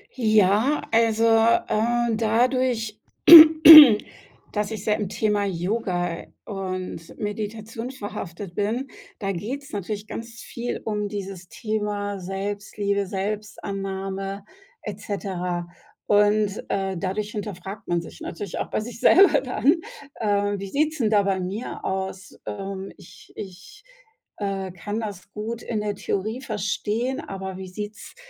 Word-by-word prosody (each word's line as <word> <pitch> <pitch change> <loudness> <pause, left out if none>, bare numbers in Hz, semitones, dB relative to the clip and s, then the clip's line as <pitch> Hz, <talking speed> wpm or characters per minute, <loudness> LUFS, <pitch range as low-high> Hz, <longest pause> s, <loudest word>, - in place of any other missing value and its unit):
Ja, 220 +3 +3
also, 225 0 +3
äh, 230 +1 +2
dadurch, 230 0 0 1.5
dass 210 +1 -2
ich 215 -2 -5
sehr 210 -1 +1
im 200 -3 -3
Thema 210 -2 0
Yoga 180 -2 -2 0.2
und 185 -4 -6
Meditation 220 +3 -5
verhaftet 195 -6 -7
bin, 230 +7 -1 0.3
da 195 -3 -2
geht's 250 +10 -6
natürlich 205 +1 -4
ganz 230 +1 -8
viel 240 +1 -5
um 210 -1 -2
dieses 195 -3 -7
Thema 210 -2 -3
Selbstliebe, 200 +1 -3
Selbstannahme 195 -1 -4 0.4
et 210 -1 -7
cetera, 180 -4 -4 0.4
und, 205 0 +2
äh, 195 -1 -1
dadurch 205 +3 -3
hinterfragt 200 0 -7
man 175 -1 0
sich 165 - -12
natürlich 195 +1 -6
auch - - -3
bei - - -1
sich 230 +1 -7
selber 360 -7 +6
dann: 255 +3 +2 0.5
„Ähm, 205 -1 +1
wie 195 - -6
sieht's 305 +5 0
denn 220 -3 +2
da 205 -2 +3
bei 195 -1 0
mir 195 +6 -5
aus? 190 0 -4
Ähm, 195 -1 -6
ich 190 -3 -16
ich, 205 - -10 0.5
äh, 195 -2 -3
kann 205 +5 -5
das 200 -3 -7
gut 225 +2 -5
in 215 -3 -3
der 210 -1 -2
Theorie 215 +6 -3
verstehen, 215 +3 -2
aber 190 - -6
wie 190 -1 -7
sieht's 205 - -8
205 Hz, 125 wpm, -24 LUFS, 195-225 Hz, 1.5 s, selber